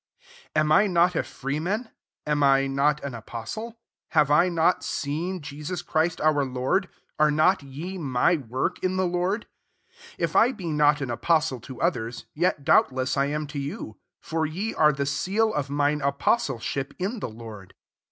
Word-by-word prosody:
1 155 - +4
Am 150 - 0
I 205 +7 +5
not 180 -1 +3
a - - +2
fra 140 +2 -4
man? 210 +7 -2 0.3
am 150 -1 0
I 135 -1 +4
hot 140 +2 +1
an 140 -2 -4
apostil 120 - -6 0.3
have 150 -4 +3
I 170 +5 +5
not 165 -2 +2
seen 165 +6 -3
Jesus 150 +4 -5
Chil 160 +2 +2
our 155 -2 +3
Lord? 130 +9 0 0.3
are 155 0 +5
not 155 +6 +3
ye 155 +8 -7
my 140 +3 +2
wd 130 +4 -2
in 185 0 0
the 185 - +2
Lord? 180 +5 -1 0.7
2 - - -5
If - - -1
I 245 +4 +5
be 195 -7 -9
not^ 150 -3 +2
apostle 135 +2 +1
to 130 +3 -10
othei*s, 120 -9 -2
yet 165 -2 0
doabtM 130 -1 +3
I 140 - +2
am 150 +1 -2
to 145 0 -6
you: 140 -6 -6 0.2
for 160 -1 -2
3ice 195 +9 -3
are 150 -2 +4
i - - +2
seal 200 +10 0
of 145 -2 -2
mine 145 +1 +1
apostlesbip 140 - -1
inti 190 - -4
Lord. 110 -5 -10
150 Hz, 170 wpm, -25 LUFS, 135-180 Hz, 0.7 s, I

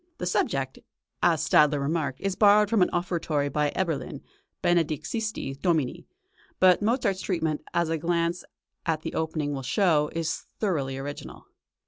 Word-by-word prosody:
The - - -4
subject, 135 -6 -1 0.4
as - - +2
Stadler 150 -1 +4
remarked, 140 -2 -2
is 195 -1 -1
borrowed 210 +1 +5
from 225 -4 +3
an 180 - +4
offertory 170 -5 -1
by 150 +1 0
Eberlin, 160 -8 -2 0.4
"Benedixisti 165 - -1
Domine"; 160 -8 0 0.5
but 185 0 +5
Mozart's 210 -4 +1
treatment, 160 -5 -1
as 170 -1 +2
a 165 -1 -1
glance 170 +1 0 0.4
at 160 -2 -1
the - - -4
opening 155 -2 -2
will 135 - -4
show, 150 - +2
is 165 -1 -2
thoroughly 140 -10 -1
original. 145 +2 -7
165 Hz, 140 wpm, -26 LUFS, 145-180 Hz, 0.5 s, borrowed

